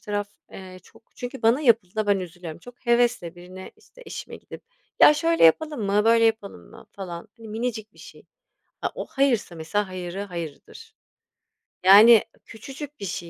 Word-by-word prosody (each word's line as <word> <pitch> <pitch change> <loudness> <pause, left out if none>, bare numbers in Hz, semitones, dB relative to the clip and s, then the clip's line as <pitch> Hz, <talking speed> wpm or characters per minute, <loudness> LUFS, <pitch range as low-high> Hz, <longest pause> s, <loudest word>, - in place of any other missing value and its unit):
taraf, 205 -1 -4 0.2
eee, 185 -1 -11
çok - - -21
Çünkü 250 0 -7
bana 230 +5 +3
yapıldığında 220 -6 +1
ben 200 -1 +2
üzülüyorum. 175 -2 -9
Çok 245 +5 -16
hevesle 235 -8 +1
birine, 180 +2 -11
işte, 470 +3 -19
eşime - - -8
gidip, - - -13 0.4
"Ya, 300 - +8
şöyle 330 +2 +2
yapalım 295 - +3
mı, 205 +1 +1
böyle 230 0 +4
yapalım 205 - -2
mı?" - - -15
falan, 175 -3 -8
hani, 225 -1 -12
minicik 220 -1 -5
bir - - -24
şey. - - -15 0.6
A, - - -1
o - - -5
hayırsa 255 -10 0
mesela 195 +6 -2
hayırı 185 +1 -6
hayırdır. 180 - -9 0.9
Yani, 210 +4 +8 0.2
küçücük 275 +6 -10
bir 200 - -6
şey 175 -1 -6
210 Hz, 165 wpm, -24 LUFS, 185-240 Hz, 0.9 s, Ya